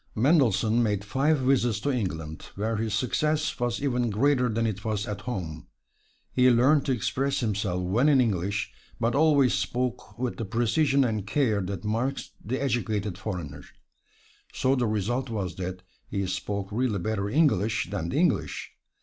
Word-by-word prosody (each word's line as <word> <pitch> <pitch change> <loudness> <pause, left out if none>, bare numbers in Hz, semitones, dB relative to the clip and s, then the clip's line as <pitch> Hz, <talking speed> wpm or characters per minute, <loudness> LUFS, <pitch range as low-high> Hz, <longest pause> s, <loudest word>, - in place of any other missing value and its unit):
Mendelssohn 115 - +3
made 105 -3 0
five 140 +8 +2
visits 125 -5 +2
to 145 - 0
England, 80 - -4
where 110 +2 -1
his 110 -1 -1
success 150 +6 0
was 120 +2 -1
even 125 -3 +1
greater 125 +3 +2
than 115 +1 0
it 105 -2 -3
was 105 -2 -2
at 105 -1 -4
home. 90 -10 -5 0.6
He 125 0 +4
learned 130 +5 +4
to - - +2
express 135 +3 0
himself 100 -5 -1
well 110 +10 +2
in 140 -3 +5
English, 100 -2 0 0.3
but 115 0 +1
always 140 -4 +4
spoke 125 -3 -2
with 125 0 -2
the 115 - -3
precision 135 +6 +2
and 110 -5 -1
care 110 -3 +1
that 95 +1 -5
marks 120 +6 -2
the 130 +5 -2
educated 110 -7 -1
foreigner. 85 -9 -5 0.9
So 130 - +1
the 125 -3 +1
result 115 +5 -1
was 95 -6 -3
that 90 0 -5 0.2
he 100 -1 -2
spoke 95 +1 -3
really 115 -1 0
better 100 +1 -2
"English" 110 - +2
than 85 -5 -2
the - - -2
English. - - 0
115 Hz, 160 wpm, -27 LUFS, 100-130 Hz, 0.9 s, in